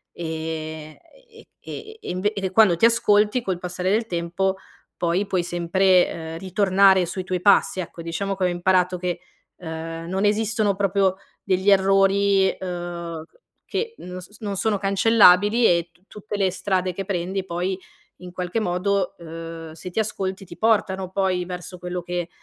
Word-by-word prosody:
e 160 Hz, -1 st, -5 dB, 0.3 s
e 455 Hz, 0 st, -17 dB, 0.2 s
e 440 Hz, +1 st, -8 dB
e -, -, -7 dB
inve 200 Hz, +4 st, -1 dB
e 190 Hz, -2 st, -3 dB
quando 195 Hz, -3 st, +5 dB
ti 170 Hz, -, +3 dB
ascolti, 215 Hz, 0 st, +3 dB
col 190 Hz, -6 st, -2 dB
passare 180 Hz, +1 st, -3 dB
del 220 Hz, +3 st, +2 dB
tempo, 180 Hz, +1 st, -1 dB, 0.4 s
poi 175 Hz, +3 st, 0 dB
puoi 185 Hz, -3 st, 0 dB
sempre, 180 Hz, +2 st, +3 dB
ehm, 160 Hz, 0 st, -6 dB
ritornare 190 Hz, 0 st, +3 dB
sui 185 Hz, +2 st, -4 dB
tuoi 185 Hz, -1 st, -2 dB
passi 200 Hz, -1 st, +4 dB
ecco. 170 Hz, -1 st, -6 dB
Diciamo 195 Hz, +4 st, -3 dB
che 190 Hz, -, -3 dB
ho 180 Hz, -, +4 dB
imparato 180 Hz, +1 st, +1 dB
che, 180 Hz, -1 st, -3 dB, 0.4 s
ehm, 165 Hz, 0 st, -6 dB
non 190 Hz, +2 st, 0 dB
esistono 215 Hz, -1 st, +1 dB
proprio 195 Hz, -1 st, +1 dB, 0.3 s
degli 190 Hz, +2 st, +2 dB
errori, 195 Hz, 0 st, +4 dB
ehm, 175 Hz, -3 st, -6 dB, 0.4 s
che 460 Hz, 0 st, -3 dB
non 180 Hz, 0 st, -7 dB
s 205 Hz, +4 st, -14 dB
non 205 Hz, -2 st, -3 dB
sono 215 Hz, 0 st, +1 dB
cancellabili 205 Hz, +2 st, +5 dB
e 170 Hz, -2 st, +3 dB
tu 175 Hz, -, -29 dB
tutte 210 Hz, 0 st, -7 dB
le 190 Hz, -2 st, +2 dB
strade 185 Hz, 0 st, -1 dB
che 195 Hz, +2 st, -5 dB
prendi 190 Hz, 0 st, -2 dB
poi 180 Hz, +2 st, -2 dB, 0.4 s
in 180 Hz, -1 st, -10 dB
qualche 180 Hz, +5 st, -2 dB
modo, 190 Hz, 0 st, -1 dB
ehm, 165 Hz, -1 st, -8 dB
se 165 Hz, +3 st, -8 dB
ti 180 Hz, -, -3 dB
ascolti 195 Hz, -2 st, -3 dB
ti 170 Hz, -, -12 dB
portano 190 Hz, -4 st, +1 dB
poi 185 Hz, -2 st, 0 dB
verso 180 Hz, 0 st, -7 dB
quello 180 Hz, 0 st, -4 dB
che, 175 Hz, 0 st, -3 dB
185 Hz, 165 wpm, -23 LUFS, 175-200 Hz, 0.4 s, quando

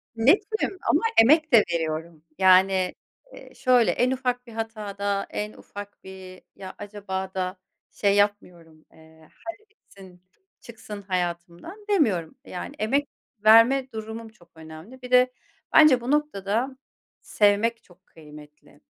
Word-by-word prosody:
Netim, 385 Hz, -, +1 dB
ama -, -, +3 dB, 0.2 s
emek 305 Hz, +5 st, +4 dB
de 220 Hz, -, +7 dB
veriyorum. 160 Hz, 0 st, -4 dB
Yani, 185 Hz, 0 st, +4 dB, 0.4 s
eee, -, -, -14 dB
şöyle, 250 Hz, -3 st, +3 dB
en 250 Hz, +1 st, +1 dB
ufak 250 Hz, -1 st, -2 dB
bir 230 Hz, -, -12 dB
hatada, 205 Hz, -3 st, -4 dB
en 210 Hz, 0 st, -5 dB
ufak 205 Hz, 0 st, -11 dB
bir 190 Hz, -1 st, -12 dB
ya 190 Hz, -1 st, -9 dB
acaba 195 Hz, -2 st, -6 dB
da 185 Hz, 0 st, -3 dB, 0.3 s
şey 200 Hz, -1 st, +1 dB
yapmıyorum, 175 Hz, -6 st, -2 dB
eee, 160 Hz, 0 st, -20 dB, 0.2 s
hadi 405 Hz, +5 st, -9 dB
bitsin, 190 Hz, -, -18 dB, 0.4 s
çıksın 215 Hz, -3 st, -10 dB
hayatımdan 180 Hz, -, -5 dB
demiyorum, 215 Hz, -, +1 dB
yani, 185 Hz, +10 st, -7 dB
emek 275 Hz, +7 st, 0 dB, 0.4 s
verme 255 Hz, +4 st, +5 dB
durumum 220 Hz, +1 st, -7 dB
çok 175 Hz, -6 st, -24 dB
önemli, 160 Hz, +11 st, -13 dB
bir 250 Hz, -, -10 dB
de, 250 Hz, 0 st, +5 dB, 0.4 s
bence 305 Hz, -6 st, +6 dB
bu 245 Hz, +3 st, -3 dB
noktada, 260 Hz, -3 st, -1 dB, 0.4 s
sevmek 215 Hz, +3 st, +1 dB
çok 185 Hz, +1 st, -24 dB
kıymetli, 150 Hz, -1 st, -16 dB
205 Hz, 125 wpm, -24 LUFS, 185-250 Hz, 0.4 s, de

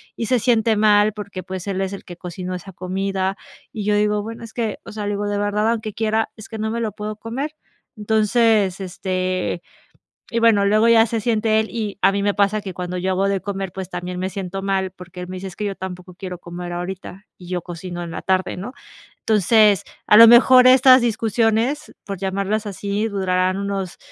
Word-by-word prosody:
y 230 Hz, -, -3 dB
se 255 Hz, -, +3 dB
siente 225 Hz, -1 st, +2 dB
mal 210 Hz, 0 st, +4 dB
porque, 200 Hz, -3 st, -7 dB
pues, 185 Hz, 0 st, -7 dB
él 195 Hz, -1 st, -2 dB
es 195 Hz, +1 st, -2 dB
el 195 Hz, -, -8 dB
que 175 Hz, -, -9 dB
cocinó 180 Hz, +1 st, -6 dB
esa 180 Hz, +2 st, -7 dB
comida. 190 Hz, +1 st, -2 dB, 0.4 s
Y 210 Hz, -3 st, -4 dB
yo 210 Hz, 0 st, +2 dB
digo, 210 Hz, 0 st, +1 dB
bueno, 225 Hz, +2 st, -8 dB
es 225 Hz, -, -10 dB
que, 225 Hz, -3 st, -2 dB
o -, -, -9 dB
sea, 210 Hz, -1 st, -5 dB
le -, -, -1 dB
digo 205 Hz, +1 st, -2 dB
de 205 Hz, 0 st, -1 dB
verdad, 210 Hz, +2 st, +1 dB
aunque 220 Hz, -2 st, -3 dB
quiera, 220 Hz, 0 st, 0 dB
es 215 Hz, -, -11 dB
que 220 Hz, -, -7 dB
no 220 Hz, +1 st, -1 dB
me 230 Hz, +1 st, -2 dB
lo 225 Hz, -2 st, -2 dB
puedo 210 Hz, +1 st, -6 dB
comer. 265 Hz, +8 st, -5 dB, 0.4 s
Entonces, 215 Hz, -2 st, +2 dB
este, 185 Hz, -1 st, -2 dB, 0.7 s
y 230 Hz, -, +1 dB
bueno, 225 Hz, -3 st, +4 dB
luego 215 Hz, +3 st, +4 dB
ya 230 Hz, 0 st, +6 dB
se 225 Hz, 0 st, -2 dB
siente 220 Hz, -1 st, +2 dB
él. 220 Hz, -, -3 dB
Y 210 Hz, -4 st, -4 dB
a 195 Hz, -, +6 dB
mí 200 Hz, 0 st, -1 dB
me 205 Hz, -, +1 dB
pasa 205 Hz, +1 st, +2 dB
que 190 Hz, -3 st, -7 dB
cuando 180 Hz, 0 st, -4 dB
yo 185 Hz, +1 st, -1 dB
hago 195 Hz, +2 st, +1 dB
de 200 Hz, -1 st, 0 dB
comer, 195 Hz, -1 st, -4 dB
pues 190 Hz, 0 st, -7 dB
también 180 Hz, 0 st, -5 dB
me 185 Hz, -, -2 dB
siento 195 Hz, 0 st, -5 dB
mal 195 Hz, -1 st, 0 dB
porque 180 Hz, -1 st, -11 dB
él 180 Hz, -, -6 dB
me 185 Hz, -, -6 dB
dice: 190 Hz, -, -6 dB
"Es 185 Hz, -, -8 dB
que 210 Hz, -, -5 dB
yo 200 Hz, -1 st, -3 dB
tampoco 180 Hz, -1 st, -8 dB
quiero 180 Hz, -1 st, -7 dB
comer 175 Hz, 0 st, -7 dB
ahorita", 185 Hz, +2 st, -6 dB
y 180 Hz, -, -12 dB
yo 180 Hz, -1 st, -3 dB
cocino 175 Hz, 0 st, -7 dB
en 170 Hz, -, -6 dB
la -, -, -6 dB
tarde, 185 Hz, -1 st, 0 dB
¿no? 205 Hz, +7 st, -6 dB, 0.5 s
Entonces, 210 Hz, -1 st, +4 dB, 0.2 s
a 210 Hz, -, +6 dB
lo 230 Hz, -, +11 dB
mejor, 250 Hz, +2 st, +7 dB
estas 260 Hz, 0 st, +7 dB
discusiones, 230 Hz, +5 st, 0 dB
por 195 Hz, -2 st, -5 dB
llamarlas 200 Hz, +3 st, -1 dB
así, 205 Hz, +2 st, -2 dB
durarán 185 Hz, -2 st, 0 dB
unos 195 Hz, -2 st, -3 dB
200 Hz, 220 wpm, -21 LUFS, 185-220 Hz, 0.7 s, lo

